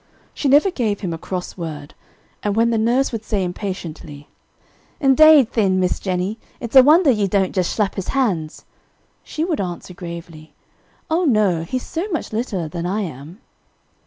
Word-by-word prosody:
She 290 - -2
never 290 +8 +5
gave 220 - -2
him 180 -5 -3
a 165 - -6
cross 180 +1 -5
word, 155 -4 -7 0.5
and 205 -1 -1
when 230 +1 +3
the 225 - +1
nurse 245 +5 +1
would 225 -2 -5
say 205 -3 -1
impatiently, 175 -6 -6 0.7
"Indade, 285 -1 +6
thin, 195 -4 +1
Miss 180 -1 0
Jennie, 190 +3 -2 0.2
it's 235 +2 -7
a 265 - +11
wonder 305 +3 +5
ye 210 -4 +1
don't 190 -1 0
just 185 -3 -1
shlap 210 -3 +1
his 195 - -5
hands!" 190 - -1 0.6
she 315 - -4
would 325 - -1
answer 180 0 -6
gravely, 170 -3 -9 0.6
"Oh, 345 +3 +2
no, 210 - +2
he's 250 +10 -4
so 345 +6 -4
much 325 - -4
littler 215 -7 -2
than 170 +2 -4
I 200 +4 -1
am." 160 - -8
200 Hz, 170 wpm, -20 LUFS, 175-255 Hz, 0.7 s, a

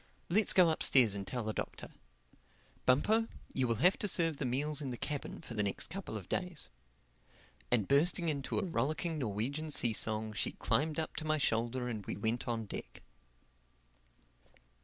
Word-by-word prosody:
Let's 205 +5 +3
go 180 -3 +6
upstairs 130 -8 +4
and 100 -1 -5
tell 125 -2 -2
the 110 0 -2
Doctor. - - -5 1.0
Bumpo, 215 - +4 0.3
you 130 -2 +1
will 115 +6 +1
have 185 - +5
to 210 - +1
serve 165 -5 +2
the 135 - -2
meals 145 +4 0
in 140 - -3
the 120 - -4
cabin 145 +2 -4
for - - -8
the 105 - 0
next 100 +9 -1
couple 185 - -5
of 95 - -9
days." 180 -4 -2 1.0
And 110 -5 +2
bursting 165 +5 +3
into 140 -4 -1
a 210 - 0
rollicking 165 -1 -1
Norwegian 130 +7 -2
sea 120 -6 +3
song, 110 0 -1
she 100 - -1
climbed 155 +1 +1
up 160 - -3
to - - -1
my 155 0 +2
shoulder 120 -1 0
and 110 -4 -4
we - - -3
went 110 +3 -1
on 115 -2 -1
deck. - - -7
135 Hz, 175 wpm, -33 LUFS, 115-160 Hz, 1.0 s, go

